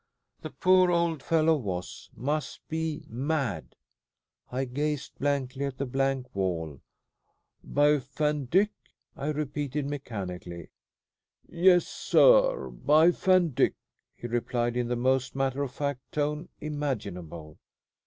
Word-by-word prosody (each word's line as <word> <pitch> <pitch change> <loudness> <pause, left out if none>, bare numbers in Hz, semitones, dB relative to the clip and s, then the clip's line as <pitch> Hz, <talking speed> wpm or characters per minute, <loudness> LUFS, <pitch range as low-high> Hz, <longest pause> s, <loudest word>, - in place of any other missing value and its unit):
The - - -6
poor 185 0 +4
old 170 -3 +1
fellow 160 +1 +3
was 95 -10 -5
must 145 +3 -3
be 160 -1 -3
mad. 130 - -2 0.8
I 130 +2 -1
gazed 145 +3 -2
blankly 140 -1 -1
at 135 -2 -5
the 140 - -2
blank 135 -1 -1
wall. 85 -7 -2 0.8
"By 145 +1 +3
Van 145 +1 -2
Dyck?" 195 - +3 0.4
I 140 - -5
repeated 150 -1 -2
mechanically. 95 - -6 0.8
"Yes, 175 +1 +4
sir, - - +4
by 155 +4 +4
Van 185 -1 +3
Dyck?" - - +2 0.4
he - - -10
replied, 120 0 -1
in 125 -1 0
the 120 - -1
most 130 +1 +1
matter 135 0 0
of 140 -3 -2
fact 140 -1 -3
tone 150 +2 -2
imaginable. 100 - -5
140 Hz, 120 wpm, -28 LUFS, 120-155 Hz, 0.8 s, poor